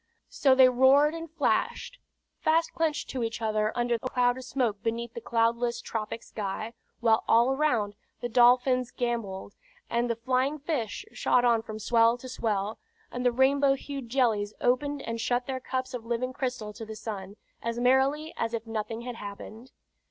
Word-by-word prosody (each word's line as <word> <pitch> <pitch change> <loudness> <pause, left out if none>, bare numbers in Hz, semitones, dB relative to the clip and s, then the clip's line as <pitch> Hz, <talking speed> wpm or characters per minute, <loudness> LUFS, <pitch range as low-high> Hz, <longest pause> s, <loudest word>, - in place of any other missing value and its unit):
So 270 -2 +3
they 260 -1 +8
roared 265 +4 +5
and 330 0 -6
flashed, 330 +9 -1 0.4
fast 325 +1 +2
clenched 315 -2 -1
to 260 - -3
each 225 0 -3
other 215 -1 0
under 240 0 0
a 255 - -3
cloud 245 -1 +2
of 260 - -8
smoke 245 -6 -1
beneath 230 +1 -3
the 235 - -7
cloudless 235 +1 +1
tropic 225 +1 -5
sky; 215 +2 -5 0.3
while 225 -2 +3
all 235 +3 +5
around, 250 -8 +1 0.3
the 240 - -3
dolphins 250 +1 +4
gamboled, 230 -6 -3 0.4
and 240 +1 +1
the 235 - +1
flying 255 +5 0
fish 285 - -3
shot 245 0 +2
on 235 -2 +4
from 215 -1 -7
swell 230 +1 +3
to 255 - -10
swell, 215 -4 -2 0.3
and 250 - -4
the 245 - +4
rainbow 270 +2 +3
hued 275 -3 -7
jellies 225 -5 +1
opened 280 +3 0
and 230 0 -4
shut 245 +2 0
their 260 0 -3
cups 260 0 -4
of 245 -2 -5
living 240 +2 -2
crystal 250 -5 -3
to 225 - -8
the 220 0 -7
sun, 205 -3 -6 0.3
as 235 0 -3
merrily 270 +5 +2
as 230 0 -1
if 230 0 -5
nothing 225 +1 -4
had 245 -1 -6
happened. 215 +4 -9
240 Hz, 175 wpm, -28 LUFS, 225-260 Hz, 0.4 s, they